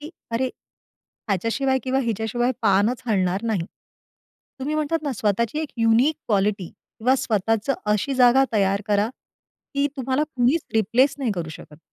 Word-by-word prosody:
की 300 +3 -8 0.2
अरे 245 +3 0 0.8
ह्याच्याशिवाय 230 +7 +1
किंवा 260 +1 +1
हिच्याशिवाय 235 +1 -1
पानच 215 +5 +2
हलणार 190 -1 +1
नाही. 205 -7 0 1.0
तुम्ही 295 +3 -2
म्हणतात 310 +1 -1
ना, 285 -3 -2
स्वतःची 225 +5 0
एक 310 - -3
युनिक 230 +7 +4
क्वालिटी 200 -2 +1
किंवा 250 +4 -2
स्वतःच 225 +2 0 0.2
अशी 210 +6 +1
जागा 255 +1 +5
तयार 200 -1 +1
करा, 205 +1 +2 0.7
की 280 +1 +2
तुम्हाला 265 +2 0
कुणीच 255 +7 +2
रिप्लेस 235 +6 +3
नाही 245 -6 0
करू 170 -3 -4
शकत. 150 -1 -12
230 Hz, 140 wpm, -23 LUFS, 205-265 Hz, 1.0 s, जागा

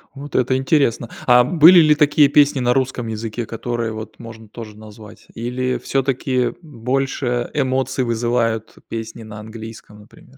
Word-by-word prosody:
Вот 140 +1 -9
это 130 +1 +2
интересно! 130 -4 +1 0.2
А 125 -1 +6
были 170 +6 +7
ли 155 -2 +5
такие 150 0 +4
песни 145 0 +3
на 125 0 +2
русском 130 -3 -2
языке, 110 +1 -5
которые 115 0 -4
вот 110 -1 -9
можно 115 -1 -11
тоже 105 -1 -10
назвать? 105 -1 -14
Или 125 +2 -2
всё-таки 130 -1 -1
больше 130 -2 -2
эмоций 130 -2 -1
вызывают 115 -1 -1
песни 115 0 -6
на 110 -1 -10
английском, 110 -1 -11
например? 125 +5 -19
120 Hz, 145 wpm, -19 LUFS, 110-135 Hz, 0.2 s, были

